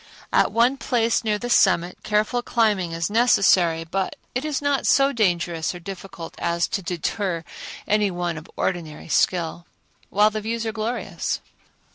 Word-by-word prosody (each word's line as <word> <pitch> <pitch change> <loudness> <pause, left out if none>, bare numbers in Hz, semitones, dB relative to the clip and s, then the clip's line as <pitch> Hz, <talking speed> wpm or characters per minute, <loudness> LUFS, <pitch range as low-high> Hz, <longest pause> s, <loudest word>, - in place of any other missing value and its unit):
At - - +4
one 240 +4 +3
place 235 -3 +1
near 215 -2 +1
the 245 - -5
summit 180 -4 +3
careful 215 +3 0
climbing 210 -8 +1
is 165 0 -1
necessary, 190 -8 +4
but 185 +3 -2 0.2
it 250 - -2
is 300 -3 -1
not 285 -1 0
so 275 0 +4
dangerous 175 - 0
or - - -7
difficult 175 -2 -8
as 170 0 0
to 200 - -2
deter 175 0 -2 0.4
any 210 -1 +2
one 175 -2 -2
of 155 0 -9
ordinary 165 -4 -3
skill, 170 0 0 0.4
while 210 +2 +4
the 215 0 -3
views 230 +2 -3
are 220 - -1
glorious. 225 +3 -3
195 Hz, 155 wpm, -23 LUFS, 170-230 Hz, 0.4 s, At